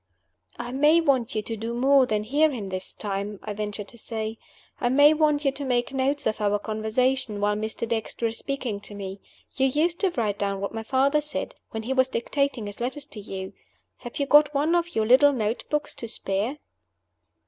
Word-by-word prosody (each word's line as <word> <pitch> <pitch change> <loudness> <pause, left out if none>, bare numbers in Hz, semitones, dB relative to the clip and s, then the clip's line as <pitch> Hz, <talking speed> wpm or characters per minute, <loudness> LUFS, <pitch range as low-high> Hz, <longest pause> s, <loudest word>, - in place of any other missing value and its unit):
"I 240 0 -5
may 295 +5 +5
want 265 -9 +1
you 215 - 0
to 225 - -4
do 225 +2 -4
more 265 +1 +5
than 215 -2 0
hear 290 +8 +3
him 220 -9 -5
this 185 0 -5
time," 200 0 -4
I 210 - -4
ventured 205 0 -4
to 235 - -12
say. 220 0 -4 0.4
"I 245 - +1
may 285 +4 +6
want 300 -1 +2
you 275 - +4
to 280 +1 -6
make 250 0 0
notes 275 +2 0
of 215 -1 -1
our 205 0 +2
conversation 220 +2 0
while 205 0 +1
Mr. 220 +2 -3
Dexter 230 0 -2
is 225 0 -1
speaking 255 -7 -3
to 205 0 -10
me. 195 -1 -6 0.3
You 265 -1 +2
used 325 +6 +1
to 390 - +2
write 210 -4 -1
down 200 -1 -1
what 200 +2 -4
my 225 - -3
father 270 +6 +2
said, 300 0 -4 0.2
when 220 0 -5
he 255 +4 -1
was 260 0 +3
dictating 275 -1 -1
his 205 0 -7
letters 265 +4 -2
to 235 - -9
you. 190 -1 -6 0.4
Have 240 - -8
you 280 - +1
got 295 +1 +5
one 300 +4 +2
of 345 0 0
your 220 - +2
little 275 +5 +6
note 225 -2 -1
books 300 0 -1
to 230 - -6
spare?" 215 +5 -1
240 Hz, 210 wpm, -25 LUFS, 215-280 Hz, 0.4 s, may